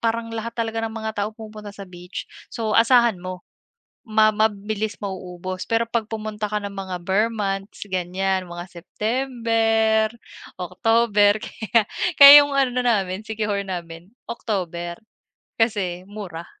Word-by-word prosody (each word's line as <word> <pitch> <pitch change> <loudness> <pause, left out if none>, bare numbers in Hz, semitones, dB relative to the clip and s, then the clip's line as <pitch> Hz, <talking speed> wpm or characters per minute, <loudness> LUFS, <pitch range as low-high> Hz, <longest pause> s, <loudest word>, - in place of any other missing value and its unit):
parang 230 0 -1
lahat 230 +1 -5
talaga 225 -1 -2
ng 220 - -7
mga 220 0 -3
tao 205 +1 0
pumupunta 215 -2 -10
sa 200 - -8
beach. 180 0 -8 0.2
So, 220 -2 -3
asahan 235 -4 +4
mo, 185 0 -7 0.6
ma 215 -1 +4
mabilis 215 0 -1
mauubos. 185 -1 -5
Pero, 230 0 +1
'pag 230 -1 -2
pumunta 215 -1 -4
ka 210 0 -2
ng 200 0 -6
mga 190 -2 -5
ber 195 +5 +2
months, 195 -2 -4
ganyan, 185 +1 -1
mga 175 0 -7
September, 225 +1 0 0.5
October. 205 +2 +3
Kaya, 225 +1 0 0.4
kaya 280 0 +12
'yung 285 -1 -3
ano 255 -2 +1
namin, 200 -4 0
Siquijor 210 -2 -2
namin, 175 0 -7 0.2
October. 175 -7 -4 0.6
Kasi 190 -6 0
mura. 180 -5 -7
210 Hz, 135 wpm, -22 LUFS, 185-225 Hz, 0.6 s, kaya